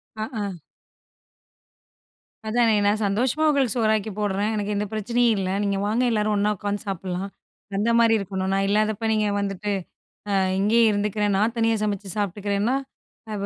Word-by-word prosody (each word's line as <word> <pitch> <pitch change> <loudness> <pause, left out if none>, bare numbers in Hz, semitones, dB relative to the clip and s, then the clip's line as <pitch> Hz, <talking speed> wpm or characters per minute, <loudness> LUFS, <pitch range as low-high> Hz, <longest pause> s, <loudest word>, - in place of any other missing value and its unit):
ஆ, 215 - -3 0.2
ஆ. - - -1 2.0
அதானே. 230 0 +3
நான் 210 +2 +2
சந்தோஷமா 245 +10 +1
உங்களுக்கு 270 -6 +1
சோறாக்கி 220 -2 +1
போட்றன். 205 +1 0
எனக்கு 210 0 -2
எந்த 205 +1 -1
பிரச்சனையும் 235 +2 +1
இல்ல. 190 -1 -1
நீங்க 200 -1 0
வாங்க 220 +4 +1
எல்லாரும் 215 -1 +1
ஒண்ணா 205 +1 +2
உட்காந்து 205 +2 -3
சாப்பட்லாம் 190 0 -3 0.5
அந்த 210 +3 +1
மாரி 230 -1 +5
இருக்கணும். 190 -1 -3
நான் 195 0 +1
இல்லாதப்ப 215 +1 +1
நீங்க 215 -1 +1
வந்துட்டு, 200 0 -3 0.6
அ - - -1 0.3
இங்கேயே 225 +4 +4
இருந்துக்கிறன். 205 0 0
நான் 220 +4 +1
தனியா 225 0 +2
சமைச்சு 205 -2 -2
சாப்ட்டுக்கிறேன்னா, 205 +3 0 0.6
அ - - -3
வ - - -1
210 Hz, 150 wpm, -24 LUFS, 200-225 Hz, 2.0 s, மாரி